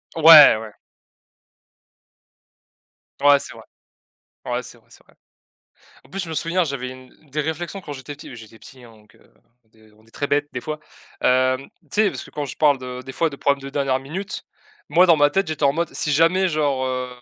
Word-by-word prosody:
Ouais, 160 -6 +9
ouais. 110 -1 -10 2.5
Ouais 145 0 +6
c'est - - -8
vrai, - - -13 0.8
ouais - - -2
c'est - - -13
vrai, - - -30
c'est - - -19
vrai. - - -26 0.9
En - - -22
plus 195 - -6
je 165 - -8
me - - -5
souviens 170 +4 0
j'avais 135 -5 -4
une 130 0 -14
des 150 +3 -2
réflexions 160 +5 -4
quand 150 -6 -8
j'étais 140 +2 -9
petit. 140 -3 -11
J'étais 110 -1 -13
petit 130 +2 -16
hein, 120 - -15
donc 105 0 -23
heu, - - -26 0.4
de 110 -1 -24
on 110 +1 -25
est - - -24
très 145 - -3
bête 145 +1 0
des 125 - -5
fois, 155 0 -5 0.4
hem, 130 +1 +2 0.2
tu - - -29
sais 210 - +3
parce 130 -8 -7
que - - -15
quand 145 -1 -4
je 140 - -8
parle 145 -3 +3
de 125 0 -7
des 130 - -8
fois 165 +4 0
de 140 - -9
problèmes 140 0 0
de 135 - -6
dernière 135 -2 -1
minute. 185 +10 -6 0.5
Moi 175 +4 +6
dans 170 -2 +5
ma 145 0 +4
tête, 195 +6 0
j'étais 155 -1 -5
en 140 - +5
mode 170 0 -3
si 150 - -2
jamais 165 +5 +3
genre, 145 -5 0
heu, 130 0 -3
145 Hz, 215 wpm, -21 LUFS, 130-160 Hz, 2.5 s, Ouais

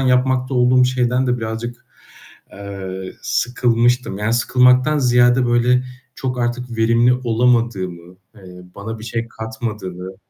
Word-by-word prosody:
yapmakta 130 0 +1
olduğum 125 +1 +4
şeyden 125 0 0
de 125 0 0
birazcık, 115 +2 -6 0.7
eee, 95 -2 -7
sıkılmıştım, 120 -3 0
yani 105 +2 -1
sıkılmaktan 125 +4 +3
ziyade, 125 -1 +3
böyle 125 +1 +2 0.3
çok 125 -1 -4
artık 120 0 -3
verimli 115 +2 +3
olamadığımı, 110 -7 0 0.2
eee, 90 -2 -13
bana 110 +2 -7
bir 110 - -10
şey 115 0 -4
katmadığını 105 -5 -6
120 Hz, 115 wpm, -19 LUFS, 110-125 Hz, 0.7 s, olduğum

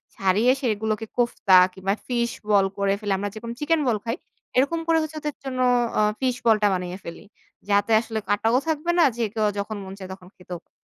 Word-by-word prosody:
ছাড়িয়ে 195 +6 +3
সেগুলোকে 220 -2 -1
কোফতা 235 -5 +3 0.2
কিংবা 190 +1 -1
ফিশ 235 -1 0 0.2
বল 200 -2 +5
করে 200 0 +1
ফেলি। 205 -2 -3
আমরা 205 +1 -3
যেকোনো 230 +2 -6
চিকেন 320 +2 +1
বল 230 -3 +2
খাই। 230 +1 -1 0.4
এরকম 280 +6 +2
করে 330 -1 +4
হচ্ছে 310 0 -5
ওদের 300 -1 -4
জন্য 260 -2 -4 0.4
আ - - +4 0.2
ফিশ 255 -2 0
বল 225 -1 +6
টা 205 - +6
বানিয়ে 180 0 -3
ফেলি। 170 - -9 0.5
যাতে 205 +2 +2
আসলে 225 -1 -4
কাটাও 225 +4 +2
থাকবে 320 +2 0
না 335 - +7
যে, 235 - 0
কেউ 215 -2 +1
যখন 215 +2 -4
মন 190 0 -8
চায় 190 -1 -8
তখন 185 -1 -14
খেতেও 180 -1 -8
পা - - -45
220 Hz, 205 wpm, -24 LUFS, 195-250 Hz, 0.5 s, না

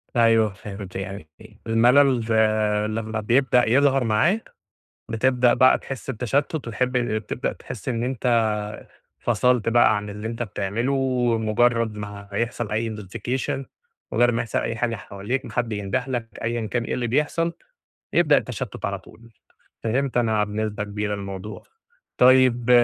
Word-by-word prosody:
أيوَه 115 -3 +4
فهمت 100 -1 -9
يعني 95 -4 -6
إ - - -15
الملل 125 +4 +5 0.8
لمّا 110 0 -3
بيبدأ 125 +2 +3
يظهر 135 +1 +4
معاك 140 - +1 0.5
بتبدأ 125 +2 +3
بقى 130 - +5
تحس 135 0 -8
بتشتُت 135 +6 -1
وتحب 125 -2 -2
ال 120 -3 +1
بتبدأ 110 - -3
تحس - - -7
إن 115 -2 -1
أنت 125 -1 -3 0.9
فصلت 120 0 +2
بقى 115 -2 +4
عن 105 0 -5
اللي 105 +2 -6
أنت 115 +1 -3
بتعمله، 105 +4 -2
ومُجرّد 120 -3 +1
ما 100 -1 -7
يحصل 115 +1 -2
أي 110 +2 0
نوتفيكيشن 120 +6 -4 0.5
مُجرِّد 120 +2 +3
ما 115 - 0
يحصل 120 -3 -2
أي 115 - -2
حاجة 115 +1 -1
حواليك، 105 +6 -4
ما - - -8
حد 120 -2 -1
ينده 105 +5 -2
لك 120 -3 -3 0.2
أيًا 115 0 -1
كان 120 +2 -1
إيه - - -3
اللي 120 -1 -1
بيحصل، 150 +6 0 0.6
يبدأ 150 -4 +5
التشتُت 125 -2 -4
على 100 -1 -3
طول. 115 +4 -17 0.5
فهمت 125 +4 -1
أنا 110 -3 +2
بنسبة 105 0 -3
كبيرة 105 0 -3
الموضوع. 100 +1 -7 0.6
طيّب 125 -1 +5
115 Hz, 145 wpm, -23 LUFS, 105-125 Hz, 0.9 s, الملل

